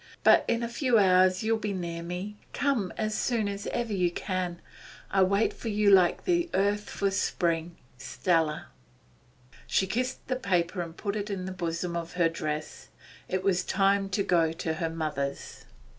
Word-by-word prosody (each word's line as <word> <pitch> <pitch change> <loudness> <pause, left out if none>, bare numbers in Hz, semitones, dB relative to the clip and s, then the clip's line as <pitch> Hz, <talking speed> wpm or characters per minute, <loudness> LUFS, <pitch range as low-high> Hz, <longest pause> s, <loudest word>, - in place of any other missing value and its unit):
But - - +6
in 235 0 0
a - - -1
few 240 0 +2
hours 185 -1 +4
you 225 +1 +2
will 225 - 0
be 210 -2 -2
near 170 -2 -4
me. 180 +5 -5 0.2
Come 255 -10 0
as 215 0 -1
soon 225 -2 0
as 200 0 -4
ever 235 -3 -2
you 180 -3 +2
can. 180 -1 -3 0.5
I 195 - +3
wait 200 +3 +3
for 230 - -6
you 210 -1 +3
like 185 -3 +4
the 345 -1 +1
earth 205 +1 +1
for 200 -1 -1
spring. 170 -3 -1 0.2
'STELLA.' 150 +4 0 1.0
She 190 - +2
kissed 250 +7 -2
the 255 - -1
paper 180 -5 0
and 165 -1 -7
put 200 -1 -3
it 210 0 -3
in 190 -2 -3
the 190 - -4
bosom 170 -1 -3
of 170 0 -4
her 175 -2 +3
dress. 155 -2 -5 0.4
It 185 0 -1
was 190 -2 +2
already - - -4
time 195 0 +2
to 195 +1 0
go 165 -4 +2
to 165 0 -3
her 165 +1 -2
mother's. 150 -4 -4
185 Hz, 185 wpm, -28 LUFS, 170-210 Hz, 1.0 s, But